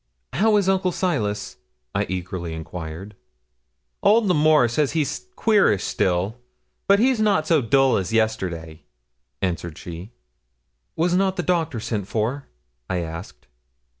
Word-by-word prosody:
'How 215 Hz, +2 st, +3 dB
is 200 Hz, -2 st, +1 dB
Uncle 190 Hz, -1 st, +2 dB
Silas?' 120 Hz, -, -2 dB, 0.4 s
I -, -, 0 dB
eagerly 90 Hz, -2 st, -4 dB
enquired. 80 Hz, +4 st, -7 dB, 0.9 s
'Old 220 Hz, +2 st, +4 dB
L'Amour 155 Hz, -7 st, +4 dB
says 135 Hz, +4 st, 0 dB
he's 160 Hz, -, -2 dB
queerish 205 Hz, -, +3 dB
still; 95 Hz, +6 st, 0 dB, 0.5 s
but 200 Hz, -, +6 dB
he's 250 Hz, +2 st, +3 dB
not 205 Hz, -8 st, +2 dB
so 155 Hz, -2 st, +3 dB
dull 135 Hz, +2 st, +3 dB
as 95 Hz, +1 st, -2 dB
yesterday,' 90 Hz, -8 st, -1 dB, 0.6 s
answered 85 Hz, -3 st, -2 dB
she. 85 Hz, +3 st, -8 dB, 0.9 s
'Was 175 Hz, +2 st, +1 dB
not 190 Hz, +1 st, +2 dB
the 180 Hz, -, -2 dB
doctor 160 Hz, -6 st, 0 dB
sent 105 Hz, -3 st, -3 dB
for?' 115 Hz, +7 st, -2 dB, 0.4 s
I 95 Hz, -, 0 dB
asked. 85 Hz, 0 st, -8 dB
120 Hz, 130 wpm, -23 LUFS, -, 0.9 s, but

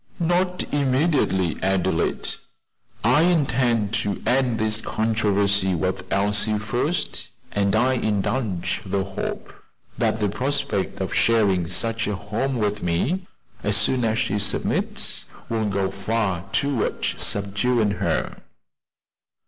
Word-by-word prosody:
"Not 180 Hz, +2 st, +1 dB
immediately, 135 Hz, -, +1 dB
Adelaide; 95 Hz, -3 st, 0 dB, 0.7 s
I 125 Hz, +7 st, +5 dB
intend 130 Hz, -, +2 dB
to 100 Hz, -2 st, -2 dB
end 125 Hz, -2 st, +2 dB
this 110 Hz, 0 st, +2 dB
controversy 100 Hz, -4 st, +1 dB
with 90 Hz, +2 st, -3 dB
Elsie 105 Hz, +2 st, +3 dB
first, 125 Hz, +10 st, -1 dB, 0.2 s
and 100 Hz, 0 st, +1 dB
I 125 Hz, +4 st, +3 dB
indulge 105 Hz, -5 st, -1 dB
the 95 Hz, 0 st, -1 dB
hope 95 Hz, 0 st, -5 dB, 0.5 s
that 110 Hz, -, +1 dB
the 105 Hz, -, +1 dB
prospect 135 Hz, -1 st, -2 dB
of -, -, -2 dB
sharing 100 Hz, -7 st, +3 dB
such 115 Hz, +6 st, 0 dB
a 105 Hz, -, -1 dB
home 110 Hz, +7 st, -2 dB
with 105 Hz, -2 st, -1 dB
me 130 Hz, -, -1 dB, 0.3 s
as 105 Hz, 0 st, +3 dB
soon 125 Hz, +2 st, +3 dB
as 110 Hz, -1 st, +1 dB
she 105 Hz, -3 st, 0 dB
submits, 105 Hz, -, -1 dB, 0.2 s
will 110 Hz, -2 st, 0 dB
go 95 Hz, -1 st, 0 dB
far 100 Hz, -3 st, -1 dB
towards 140 Hz, -5 st, -1 dB
subduing 105 Hz, +2 st, +1 dB
her." 100 Hz, -, -1 dB
105 Hz, 115 wpm, -23 LUFS, 100-125 Hz, 0.7 s, I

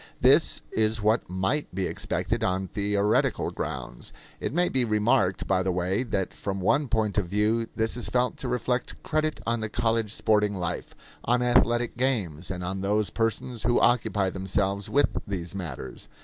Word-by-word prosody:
This -, -, +5 dB
is 110 Hz, 0 st, +1 dB
what 110 Hz, -1 st, +2 dB
might 95 Hz, +7 st, -1 dB
be 95 Hz, -1 st, 0 dB
expected -, -, -2 dB
on 95 Hz, +1 st, 0 dB
theoretical 100 Hz, +2 st, +1 dB
grounds. -, -, -6 dB, 0.3 s
It -, -, -3 dB
may 175 Hz, +5 st, +2 dB
be 130 Hz, -5 st, +2 dB
remarked, 105 Hz, -4 st, +2 dB
by 95 Hz, -1 st, +2 dB
the 95 Hz, 0 st, 0 dB
way, 90 Hz, +4 st, 0 dB
that 100 Hz, -7 st, -2 dB
from 100 Hz, -1 st, -4 dB
one 140 Hz, +10 st, +2 dB
point 110 Hz, -3 st, +1 dB
of 95 Hz, -, -3 dB
view 105 Hz, +4 st, +1 dB
this 110 Hz, 0 st, 0 dB
is 120 Hz, -, -2 dB
felt 125 Hz, 0 st, +1 dB
to 130 Hz, -, -5 dB
reflect 125 Hz, 0 st, -2 dB
credit 155 Hz, 0 st, -1 dB
on 115 Hz, 0 st, 0 dB
the 110 Hz, -1 st, -3 dB
college 115 Hz, -1 st, 0 dB
sporting 105 Hz, -2 st, +2 dB
life, 90 Hz, -1 st, -4 dB, 0.3 s
on 125 Hz, +2 st, +2 dB
athletic 120 Hz, -1 st, +2 dB
games, 100 Hz, -, -1 dB
and 90 Hz, -1 st, -4 dB
on 95 Hz, +2 st, -3 dB
those 105 Hz, +1 st, +1 dB
persons 115 Hz, +1 st, -1 dB
who 120 Hz, +2 st, +2 dB
occupy 105 Hz, -5 st, +2 dB
themselves 95 Hz, +1 st, -1 dB
with 145 Hz, +1 st, +3 dB, 0.2 s
these 90 Hz, -4 st, -4 dB
matters. 75 Hz, -9 st, -6 dB
105 Hz, 170 wpm, -26 LUFS, 95-120 Hz, 0.3 s, This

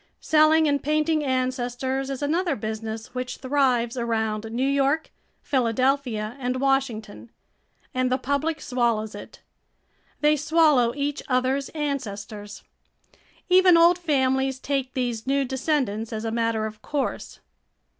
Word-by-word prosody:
Selling 315 Hz, 0 st, +4 dB
and 285 Hz, -2 st, +1 dB
painting 305 Hz, +1 st, +1 dB
ancestors 260 Hz, 0 st, -1 dB
is 275 Hz, +1 st, -4 dB
another 330 Hz, +2 st, 0 dB
business 220 Hz, +2 st, -5 dB
which 255 Hz, 0 st, -4 dB
thrives 260 Hz, -3 st, +1 dB
around 225 Hz, -2 st, -2 dB
New 240 Hz, +4 st, -1 dB
York, 280 Hz, +3 st, +1 dB, 0.3 s
Philadelphia, 250 Hz, -3 st, 0 dB
and 250 Hz, 0 st, -2 dB
Washington. 250 Hz, -5 st, -1 dB, 0.6 s
And 255 Hz, 0 st, 0 dB
the 255 Hz, -, +3 dB
public 285 Hz, +5 st, -1 dB
swallows 235 Hz, -4 st, 0 dB
it. -, -, -11 dB, 0.8 s
They 300 Hz, 0 st, +4 dB
swallow 300 Hz, -5 st, +3 dB
each 290 Hz, +1 st, -2 dB
other's 260 Hz, +1 st, 0 dB
ancestors. 215 Hz, -8 st, -5 dB, 0.8 s
Even 365 Hz, -1 st, +6 dB
old 340 Hz, +1 st, +5 dB
families 265 Hz, -4 st, +1 dB
take 265 Hz, -1 st, -3 dB
these 245 Hz, -3 st, -2 dB
new 275 Hz, 0 st, +2 dB
descendants 260 Hz, -5 st, -1 dB
as 220 Hz, 0 st, -4 dB
a 225 Hz, -, -1 dB
matter 230 Hz, -1 st, 0 dB
of 215 Hz, 0 st, -7 dB
course. 290 Hz, -2 st, -3 dB
260 Hz, 125 wpm, -24 LUFS, 230-285 Hz, 0.8 s, Even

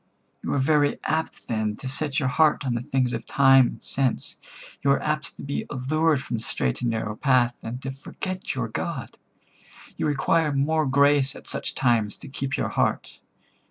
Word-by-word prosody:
You -, -, -3 dB
are -, -, +1 dB
very 145 Hz, +1 st, +3 dB
apt 160 Hz, +1 st, -2 dB
then 110 Hz, -2 st, -1 dB
to 130 Hz, -, -7 dB
set 140 Hz, +1 st, 0 dB
your 135 Hz, -3 st, 0 dB
heart 150 Hz, +1 st, +3 dB
on 125 Hz, -, 0 dB
the 120 Hz, -, -1 dB
things 125 Hz, -1 st, 0 dB
of 115 Hz, -, -5 dB
time 135 Hz, -2 st, +6 dB
and -, -, -9 dB
sense. 135 Hz, -2 st, -1 dB, 0.5 s
You 140 Hz, -, +1 dB
are 140 Hz, -, +4 dB
apt 150 Hz, 0 st, -2 dB
to -, -, -9 dB
be 140 Hz, 0 st, -3 dB
allured 150 Hz, +2 st, +1 dB
from 120 Hz, -, -3 dB
the 110 Hz, -, -7 dB
straight 65 Hz, -, -2 dB
and 120 Hz, -, +1 dB
narrow 110 Hz, -2 st, -2 dB
path, 125 Hz, -2 st, +3 dB
and 115 Hz, +2 st, -5 dB
to 135 Hz, -, -3 dB
forget 185 Hz, +7 st, -5 dB
your 125 Hz, -3 st, -1 dB
God. 130 Hz, +4 st, -4 dB, 0.8 s
You -, -, 0 dB
require 150 Hz, +2 st, +2 dB
more 150 Hz, +2 st, +1 dB
grace 140 Hz, 0 st, +3 dB
at -, -, -12 dB
such -, -, -4 dB
times 115 Hz, -5 st, +1 dB
to -, -, -11 dB
keep 135 Hz, 0 st, -3 dB
your -, -, -1 dB
heart. -, -, -1 dB
135 Hz, 195 wpm, -25 LUFS, 125-145 Hz, 0.8 s, time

